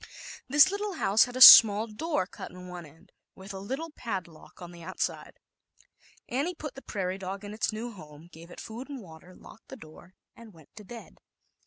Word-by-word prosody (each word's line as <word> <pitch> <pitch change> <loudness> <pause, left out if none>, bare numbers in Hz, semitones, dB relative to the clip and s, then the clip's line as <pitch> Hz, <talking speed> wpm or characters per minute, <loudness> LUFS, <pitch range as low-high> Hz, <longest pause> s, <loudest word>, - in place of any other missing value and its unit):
This 295 +6 +5
lit 405 - -4
tle 415 -1 -4
house 215 - +2
had 245 -1 -11
a 255 - -4
small 215 -3 +10
door 230 - -3
cut - - -11
in 180 0 -13
one 175 -2 -10
end, 160 +3 -22 0.2
with 195 +1 -11
a 190 - -8
little 270 +11 -6
padlock 185 - -8
on 175 -1 -11
the 170 -1 -14
out 185 +3 -10
side. - - -4 0.9
Annie 290 +9 -3
put 300 -3 -8
the 270 - -12
prairie 190 -5 -5
dog 195 +1 -7
in 205 - -8
its 215 - -2
new 225 +3 -7
home, 155 -5 -14
gave 165 +2 -14
it - - -13
food 235 +5 -9
and 280 -2 -7
water, 175 -2 -15
locked 220 - -17
the 265 - -11
door 175 -1 -16 0.2
and 225 -3 -15
went 160 -3 -21
to 210 - -11
bed. 230 +3 -13
200 Hz, 210 wpm, -27 LUFS, 180-245 Hz, 0.9 s, small